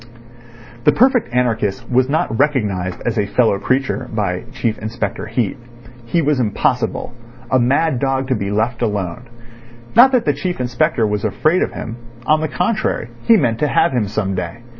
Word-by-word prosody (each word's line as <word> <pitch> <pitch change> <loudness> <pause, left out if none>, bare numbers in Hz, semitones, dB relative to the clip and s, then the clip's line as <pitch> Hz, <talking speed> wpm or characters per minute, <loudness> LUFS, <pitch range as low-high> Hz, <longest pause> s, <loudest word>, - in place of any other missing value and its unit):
The 150 - +6
perfect 245 - +3
anarchist 120 -2 0
was 130 +1 +2
not 140 -6 0
recognised 105 -11 0
as 120 -2 0
a 100 - 0
fellow 110 -2 +2
creature 130 +2 -1
by 100 -5 -2
Chief 120 -4 -2
Inspector 110 -2 -4
Heat. 115 -1 -1 0.5
He 165 +7 +1
was 145 -2 +1
impossible—a 120 +2 -1
mad 135 +3 +2
dog 135 0 0
to 130 - +2
be 100 -3 -3
left 110 +4 -1
alone. 105 +2 -2 0.7
Not 250 +4 +8
that 245 -2 +2
the - - +2
Chief 180 -5 -3
Inspector 125 +1 +1
was 105 -1 -1
afraid 155 - +1
of - - -1
him; 115 +1 -6 0.3
on 155 0 +3
the 155 - 0
contrary, 180 - -1 0.2
he 230 - +7
meant 120 - 0
to 150 - +2
have - - +2
him 120 -5 0
some 100 -1 -2
day. 90 +5 -5
120 Hz, 170 wpm, -18 LUFS, 105-140 Hz, 0.7 s, Not